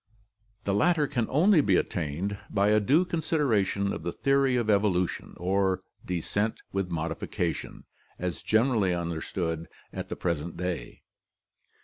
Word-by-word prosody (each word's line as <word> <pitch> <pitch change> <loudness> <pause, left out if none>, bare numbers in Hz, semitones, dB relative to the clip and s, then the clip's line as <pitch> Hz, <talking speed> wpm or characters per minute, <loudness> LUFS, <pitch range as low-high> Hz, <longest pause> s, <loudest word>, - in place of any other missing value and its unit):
The 100 - 0
latter 155 - +3
can 120 -4 -1
only 165 +4 +5
be 100 -9 +3
attained 90 +5 -1
by 100 0 +2
a 105 0 +5
due 145 - +3
consideration 135 - +1
of - - -5
the 85 - -2
theory 135 +2 +2
of 120 -2 +1
evolu 100 -4 +3
tion - - -8
(or 95 +1 +1 0.2
descent 100 +5 -1
with 95 -2 -1
modification) 80 -1 -3 0.3
as 90 -1 -3
generally 110 -5 +2
understood 85 -1 -3 0.3
at - - -5
the - - -3
present 85 -1 -2
day. 90 -9 -4
100 Hz, 135 wpm, -28 LUFS, 90-120 Hz, 0.3 s, only